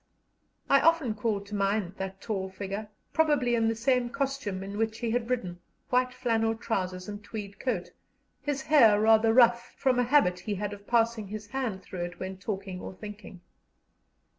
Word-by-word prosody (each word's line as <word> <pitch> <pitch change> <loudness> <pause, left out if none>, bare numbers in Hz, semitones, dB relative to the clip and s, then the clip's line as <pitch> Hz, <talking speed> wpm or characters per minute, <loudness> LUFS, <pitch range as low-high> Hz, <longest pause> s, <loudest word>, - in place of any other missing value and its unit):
I 275 - +5
often 325 -8 +3
call 215 -1 -1
to 200 +1 -12
mind 200 -2 0
that 190 0 -5
tall 195 -4 -3
figure, 200 +2 -5 0.2
probably 295 -6 +3
in 230 -1 +2
the 225 - +1
same 245 +1 +1
costume 265 -8 -2
in 200 +2 -6
which 225 0 0
he 230 -1 -2
had 235 0 -1
ridden 185 -9 -2 0.3
white 250 0 +3
flannel 225 -2 0
trousers 185 -5 -3
and 205 0 -7
tweed 205 -2 -7
coat 185 -9 -2 0.5
his 280 -2 -2
hair 230 -9 +6
rather 220 +1 +5
rough, 235 0 +4
from 255 -2 +2
a - - +4
habit 240 -9 +3
he 205 +3 -3
had 205 +1 -3
of 205 0 -12
passing 230 -3 +2
his 210 +1 -6
hand 215 -4 -3
through 180 -1 -7
it 175 0 -9
when 190 0 -5
talking 190 -1 -5
or - - -7
thinking. 210 -2 -10
220 Hz, 180 wpm, -28 LUFS, 195-240 Hz, 0.5 s, hair